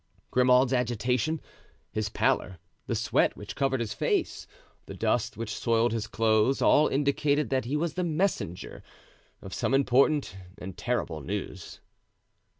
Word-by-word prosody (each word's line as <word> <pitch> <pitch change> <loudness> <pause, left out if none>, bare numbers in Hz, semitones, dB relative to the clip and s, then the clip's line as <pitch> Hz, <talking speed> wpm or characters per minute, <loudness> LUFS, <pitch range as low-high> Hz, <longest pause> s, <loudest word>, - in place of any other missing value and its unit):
Grimaud's 125 +1 +4
agitation, 125 +4 0 0.5
his 110 -1 -2
pallor, 95 -2 0 0.3
the - - -1
sweat - - +1
which - - -8
covered 135 -2 0
his 115 - -3
face, - - -1 0.4
the - - -8
dust - - 0
which 110 -1 -4
soiled 115 0 +1
his 110 -2 -2
clothes, 110 +3 +2
all 150 - +5
indicated 145 +1 +1
that 130 -3 +1
he 140 +5 -1
was 165 0 -1
the 180 - -2
messenger 160 - -2 0.6
of - - -8
some 135 - 0
important 135 -3 +2 0.2
and 95 -3 -8
terrible 90 -10 -2
news. 95 +2 -6
125 Hz, 140 wpm, -28 LUFS, 110-140 Hz, 0.6 s, all